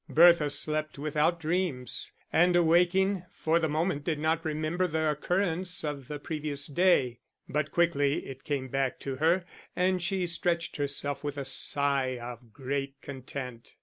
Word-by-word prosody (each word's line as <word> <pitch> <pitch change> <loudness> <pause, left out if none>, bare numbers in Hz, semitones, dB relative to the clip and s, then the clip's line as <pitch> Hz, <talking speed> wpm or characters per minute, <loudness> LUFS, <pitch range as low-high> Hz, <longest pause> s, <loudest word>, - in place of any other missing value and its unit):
Bertha 170 -2 +6
slept 155 +1 -2
without 155 +3 +1
dreams, 160 -7 -1 0.2
and 175 +2 +4
awaking, 180 +3 +3
for 160 +1 +1
the 160 -2 0
moment 155 0 0
did 160 -2 -1
not 160 +2 0
remember 155 +3 -1
the 160 -1 +1
occurrence 180 +3 0
of 145 -4 -4
the 150 - -4
previous 145 -2 -3
day; 145 -7 +2 0.3
but 150 0 -1
quickly 155 -4 +2
it 135 0 -9
came 140 -3 -2
back 135 0 -1
to 135 -1 -4
her 170 +5 +2 0.3
and 185 0 +2
she 180 +1 0
stretched 170 -1 -1
herself 145 0 -2
with 145 -1 -4
a 140 - -3
sigh 135 -1 +1
of 120 -1 -9
great 135 +2 -4
content. 130 -3 -7
155 Hz, 150 wpm, -29 LUFS, 140-170 Hz, 0.3 s, Bertha